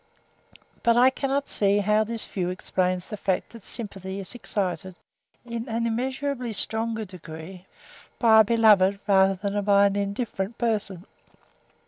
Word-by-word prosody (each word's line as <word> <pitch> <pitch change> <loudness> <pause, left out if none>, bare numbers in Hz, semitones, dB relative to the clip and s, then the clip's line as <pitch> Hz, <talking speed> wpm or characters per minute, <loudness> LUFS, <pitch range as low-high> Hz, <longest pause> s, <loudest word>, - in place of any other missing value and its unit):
But 235 0 +3
I 255 +2 +6
cannot 275 +1 -2
see 200 0 +2
how 210 +1 +2
this 225 +1 0
view 180 -3 -3
explains 185 0 -1
the 210 - -6
fact 190 -2 -2
that 230 - -12
sympathy 195 -3 -6
is 195 - -2
excited, 190 -5 -3 0.5
in 235 +1 -5
an 230 +1 -1
immeasurably 255 +1 -2
stronger 220 +1 -1
degree, 180 0 -10 0.5
by 220 -2 +6
a - - +8
beloved, 205 -3 +4
than 195 +1 +2
by 200 0 +5
an 200 0 +1
indifferent 200 +1 -3
person. 205 -6 -2
205 Hz, 135 wpm, -25 LUFS, 190-230 Hz, 0.5 s, a